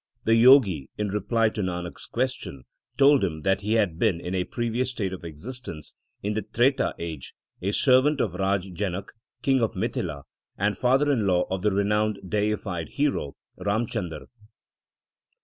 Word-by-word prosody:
The 115 - +1
Jogi, 115 - +6
in 105 -1 -1
reply 110 +3 +1
to 110 - -4
Nanak 90 -2 -4
s - - -6
question, 65 -2 -3 0.3
told 140 -2 +6
him 80 -5 -2
that 95 0 +2
he 105 +2 -1
had 100 -7 +1
been, 105 -7 +2
in 90 +2 -5
a 90 -1 0
previous 120 +4 -2
state 100 -7 -3
of 95 - -8
existence 85 - -7 0.3
in 105 +1 -1
the 110 - -1
Treta 120 +6 +1
age, 80 -5 -7 0.3
a 95 +3 0
servant 135 +5 +4
of - - 0
Raja 95 0 -1
Janak, 95 +1 -3 0.3
King 135 -2 +3
of 115 -1 0
Mithila, 80 -5 -3 0.3
and 105 +1 +1
father 135 +6 +3
in 115 -7 +1
law 90 -1 +3
of 95 -1 -1
the 105 - +3
renowned 105 +1 +1
deified 105 -4 -1
hero 140 - -1 0.2
Ram 100 +5 0
Chandar. 90 -9 -5
100 Hz, 165 wpm, -26 LUFS, 90-115 Hz, 0.3 s, Jogi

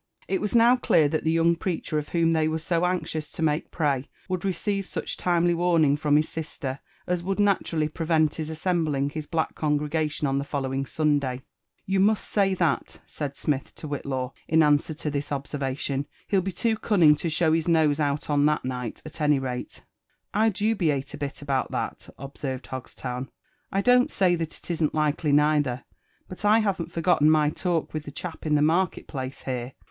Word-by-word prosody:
It 190 - 0
was 210 +2 -1
now 235 +2 +6
clear 160 -10 +3
th^t 155 +2 -1
the 160 - +1
young 165 +1 +3
preacher 165 -3 -2
of 150 - -7
whom 165 -1 +2
they 160 -1 +2
were 155 0 0
so 170 +2 0
anxious 160 -4 -3
to 165 - -3
make 150 0 0
prey 140 -5 -1 0.2
would 185 -2 -2
receive 195 +1 -1
such - - -3
timely 175 -1 +2
warning 165 -4 +3
from 145 0 +1
his 155 +1 +2
sister, 145 -4 -5 0.3
as 180 -1 -1
would 195 +3 -2
naturally 185 -6 +2
prevent 160 -1 +1
his 155 -1 -5
assembling 155 -4 0
his 155 -1 -5
black 165 -2 -1
congrega 150 +1 0
tion 150 0 -2
on 135 0 +1
the - - -2
following 135 -1 -2
Sunday. 140 -4 0 0.4
You 190 0 +1
may 210 +3 +5
say 195 -2 0
that," 170 -5 -1
said 140 -2 -5
Smith 140 -3 -2
to 155 - -8
Whillaw; 135 -3 -3
in 160 0 +4
answer 150 +1 +2
to 150 0 -4
this 145 0 -3
observation: 140 0 -2
*' - - -33
he* - - 0
11 190 -2 +2
be 195 - -1
too 225 +3 0
cunning 175 -10 +5
to 165 - -2
show 160 0 +2
his 165 0 +1
nose 160 -3 +3
out 145 -1 0
on 145 -1 +3
that 150 -3 0
night, 125 -3 -4
at 155 +1 -9
any 150 -1 +4
rate.".! 125 -2 -5 0.5
dubiate 205 -10 +1
a - - -6
bit 145 0 -5
about 135 -2 0
that," - - -4
observed 135 0 -5
Hogstown; 130 0 -6 0.4
I 195 - +1
don't 250 +2 +5
say 185 -2 +2
that 165 -2 -4
it - - -7
isn't 160 -3 0
likely 150 0 +1
neither; 145 -3 +2 0.4
but 185 - -10
I 210 +1 +5
haven't 200 -6 -1
forgotten 165 -2 +3
my 155 -1 +4
talk 170 -1 -1
with 155 -1 -4
the 145 - -7
chap 165 +1 -6
in 150 - +3
the 145 - +3
market 170 +3 +1
place 130 -2 -6
here. 125 -1 -4
155 Hz, 195 wpm, -26 LUFS, 145-175 Hz, 0.5 s, now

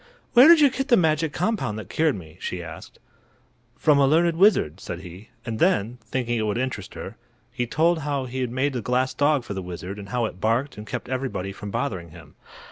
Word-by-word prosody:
"Where 255 +3 +9
did 335 -1 +8
you 285 -3 +6
get 270 +1 -3
the 240 -4 +5
magic 160 -2 +2
compound 180 - -1
that 110 - -7
cured 155 -3 +1
me?" 80 -2 -11
she 90 -1 -4
asked. 80 -1 -10 0.8
"From 150 -2 +4
a 140 - +5
learned 165 +3 +3
wizard," 165 - +3
said 85 -2 -6
he; 95 +4 -11 0.2
and 115 -2 -4
then, 115 +5 +1
thinking 120 0 -1
it 110 - -1
would 105 - -1
interest 125 -6 -4
her, - - -8 0.3
he 120 - -2
told 165 +6 +2
how 145 -3 -2
he 130 +1 -5
had 125 - -1
made 130 +4 0
the 125 - -2
glass 130 +3 0
dog 145 -2 +2
for 105 - -6
the 95 - -4
wizard, 90 +2 -7
and 100 -1 -9
how 120 +1 0
it 95 -4 -7
barked 120 +6 0
and 105 +1 -9
kept - - -5
everybody 130 -7 -3
from 100 +1 -8
bothering 90 -3 -3
him. - - -14
125 Hz, 220 wpm, -24 LUFS, 100-150 Hz, 0.8 s, Where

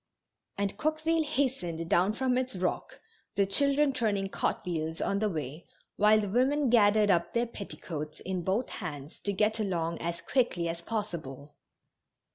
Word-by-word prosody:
And 200 0 -2
Coqueville 315 +1 +1
hastened 255 - -1
down 185 +5 +3
from 255 +2 +1
its 255 -3 -1
rock, 180 0 -2 0.4
the 200 0 +3
children 280 +7 +3
turning 205 -6 0
cartwheels 160 -4 -2
on 200 - 0
the 215 0 +1
way, 155 -2 -5 0.3
while 210 +1 +5
the 205 - -2
women 260 +5 +2
gathered 210 -2 +5
up 170 -2 +1
their 235 +1 +3
petticoats 160 -8 -7
in 185 -1 -3
both 195 +8 0
hands 150 -5 -7
to 200 - -2
get 210 +3 +1
along 170 -5 -1
as 170 0 -3
quickly 180 -7 +1
as 170 0 -4
possible. 170 - -5
200 Hz, 150 wpm, -30 LUFS, 170-240 Hz, 0.4 s, while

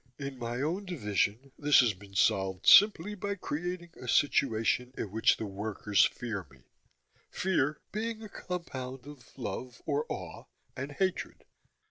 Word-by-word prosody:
In 140 -2 -6
my 120 +2 -3
own 180 +7 -1
division 115 - -1
this 145 -2 +6
has 120 -4 +2
been 100 +1 -15
solved 95 -1 +2
simply 205 -1 +7
by 200 0 -3
creating 175 0 -4
a 125 - -8
situation 125 -2 +2
in 100 - -4
which 110 +2 +3
the 110 - -4
workers 105 0 +1
fear 110 -7 -4
me 65 -2 -20 0.7
fear 155 -6 0
being 225 +1 -3
a - - -6
compound 135 -10 -6
of 145 -2 -13
love, 125 0 -5
or 150 0 0
awe, 90 -4 -6 0.3
and 135 +3 -5
hatred. 185 +3 -2
130 Hz, 145 wpm, -30 LUFS, 110-170 Hz, 0.7 s, simply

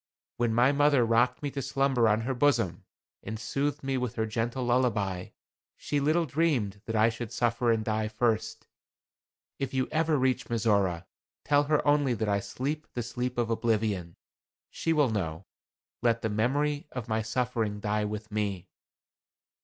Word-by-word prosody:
When 120 -1 +1
my 120 +4 +4
mother 145 -3 +4
rocked 120 +4 +2
me 145 - -2
to 140 - -3
slumber 135 -3 +2
on 110 +1 +2
her 130 +4 -1
bosom, 120 -10 +1 0.4
and 110 +2 -6
soothed 140 +5 -2
me 135 -1 -1
with 125 -2 -3
her 110 - 0
gentle 115 +4 -2
lullaby, 115 -7 +1 0.5
she 145 - -1
little 155 +4 +2
dreamed 130 -10 0
that 115 - -3
I 110 +1 +5
should 115 -1 -6
suffer 120 0 +1
and 110 -1 0
die 110 -1 0
first. 110 0 -1 0.9
If 135 -1 -3
you 130 -1 +1
ever 160 -1 +2
reach 130 -1 +1
Mizora, 100 -7 +1 0.4
tell 145 0 +3
her 150 0 +1
only 145 -4 +3
that 110 0 -2
I 100 0 +2
sleep 145 +9 -4
the 120 - -1
sleep 125 +1 -3
of 115 -1 0
oblivion. 110 -7 0 0.6
She 165 - -1
will 145 -6 +3
know. 90 -4 -3 0.6
Let 115 -1 +1
the 110 - 0
memory 145 - 0
of 125 -2 -5
my 110 -1 0
suffering 115 -2 -1
die 105 +1 0
with 105 +1 -5
me." 100 -4 -2
120 Hz, 165 wpm, -28 LUFS, 110-135 Hz, 0.9 s, I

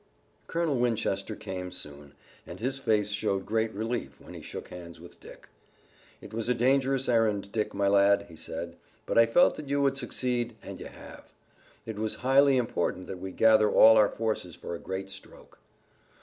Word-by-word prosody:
Colonel 165 -5 0
Winchester 110 -3 -1
came 90 -3 -6
soon, 75 -5 -9 0.3
and - - -9
his 130 +4 -2
face 105 -5 +1
showed 100 -2 -1
great 110 +1 0
relief 110 - -4
when - - -13
he - - -9
shook - - -8
hands 85 -2 -10
with 85 +1 -14
Dick. - - -14 0.7
"It 105 - -12
was 115 +1 -2
a 125 - +3
dangerous 135 +1 +2
errand, 110 -4 +1
Dick, 105 -1 -1
my 100 0 +1
lad," 100 0 +4
he 85 - -13
said, 85 +2 -6 0.3
"but - - -3
I 115 - +6
felt 145 +10 +4
that 150 -3 -8
you 140 0 +1
would 135 -1 +1
succeed 120 -3 -2
and - - -8
you - - -7
have. - - -13 0.5
It 110 -2 -6
was 110 0 -2
highly 135 +1 +5
important 95 -6 -1
that 95 - -7
we 95 +1 -6
gather 110 +1 +4
all 110 0 +7
our 105 -2 +5
forces 110 -7 -3
for - - -7
a 85 - -5
great 95 0 -5
stroke." - - -13
110 Hz, 185 wpm, -28 LUFS, 95-120 Hz, 0.7 s, all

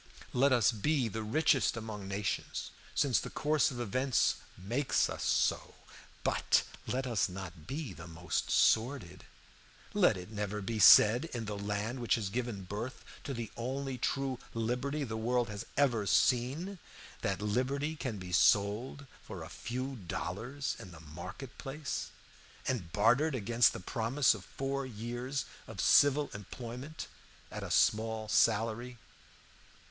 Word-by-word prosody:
Let 135 +3 +4
us 125 -1 +5
be 125 +2 +1
the 110 +1 -4
richest 125 +1 +2
among 110 -3 -6
nations, 100 +1 -3 0.2
since 135 -4 +3
the - - -6
course 150 +1 +2
of 125 - -6
events 130 +3 +1 0.2
makes 120 +9 +1
us - - -4
so, - - +1 0.5
but - - +2 0.2
let 130 +2 -1
us 115 -6 +1
not 90 -4 -8
be 140 - -4
the 85 +1 -10
most 85 +1 -3
sordid. 110 -6 +2 0.7
Let - - +4
it 90 +3 -9
never 105 -1 -3
be 110 +2 -3
said, 115 +6 +8
in 120 -2 -3
the 105 0 -4
land 105 +4 -3
which 120 - +2
has 105 -5 -2
given 115 -3 -3
birth 105 +7 -6 0.2
to 140 - -3
the 115 -2 -5
only 130 +2 -3
true 135 -1 -1 0.2
liberty 125 +6 -1
the 110 -4 -4
world 120 +1 +1
has 105 -1 -6
ever 120 -8 +2
seen, 140 - +2 0.4
that 95 0 -1
liberty 130 +8 -1
can 130 -8 -4
be 90 -1 -7
sold 105 +9 +2 0.2
for - - -8
a - - -9
few 130 +3 -4
dollars 120 - -3
in 105 -5 -9
the 85 -2 -12
market 90 - -9
place, 140 +2 -4 0.6
and 105 -11 -2
bartered 125 - +3
against 120 +1 +4
the - - -6
promise 115 +8 +2
of 100 -4 -9
four 135 0 -3
years 120 +3 -4 0.2
of - - -9
civil 145 +1 +5
employment 120 - -7 0.5
at - - -5
a - - -5
small 110 0 +2
salary! 115 +3 +2
120 Hz, 145 wpm, -32 LUFS, 105-135 Hz, 0.7 s, said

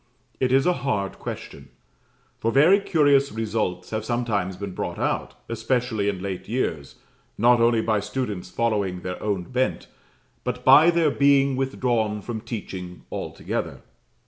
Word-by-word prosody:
It 130 -1 +1
is 135 +1 +4
a 180 - +4
hard 100 -8 -2
question. - - -8 0.7
For 115 - 0
very 165 - +6
curious 145 -7 +3
results 105 -5 -2
have 110 -1 -2
sometimes 110 -6 -1
been 100 -1 -6
brought - - -4
out, - - -2
especially 115 -2 -1
in 95 -2 -4
late 95 -1 -5
years, 80 - -2 0.4
not 120 +1 +4
only 115 -1 +3
by 110 -2 +1
students 105 -2 -4
following 105 -6 -1
their 90 0 -5
own 100 -4 -1
bent, 130 +7 -1 0.6
but - - -4
by 145 +6 +8
their 165 -3 +3
being 140 -1 +3
withdrawn 120 -5 -1
from 110 -1 -5
teaching 95 -6 -7
altogether. - - -4
115 Hz, 145 wpm, -24 LUFS, 100-130 Hz, 0.7 s, by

